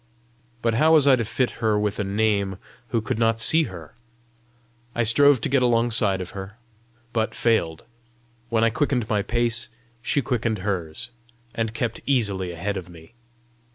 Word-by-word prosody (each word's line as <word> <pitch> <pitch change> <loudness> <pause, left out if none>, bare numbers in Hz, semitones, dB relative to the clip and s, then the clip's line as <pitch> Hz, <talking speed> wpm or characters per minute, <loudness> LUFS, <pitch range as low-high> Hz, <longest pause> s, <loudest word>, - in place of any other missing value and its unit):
But 115 -1 +1
how 155 +8 +4
was 155 -3 +6
I 140 -2 +6
to 120 - -1
fit 125 +3 -1
her 110 -2 +2
with 105 0 -2
a - - 0
name 100 -1 0 0.3
who 115 0 -1
could 110 - -3
not 115 -1 +2
see 160 +7 +5
her? 85 - -10 1.0
I 120 - +1
strove 140 +4 +5
to - - 0
get 135 -1 +2
alongside 115 -5 +3
of 90 - -7
her, 95 +2 -9 0.6
but 110 -1 -1
failed: 85 -9 0 0.6
when 115 0 +1
I 115 - +3
quickened 125 -4 -1
my 105 -2 +1
pace 115 +1 -1 0.3
she 140 +3 0
quickened 115 -2 -1
hers, 90 0 -3 0.4
and 115 -1 -3
kept 120 -2 -3
easily 100 -9 0
ahead 95 +4 -4
of 90 -2 -7
me. 80 +3 -15
110 Hz, 165 wpm, -23 LUFS, 100-120 Hz, 1.0 s, was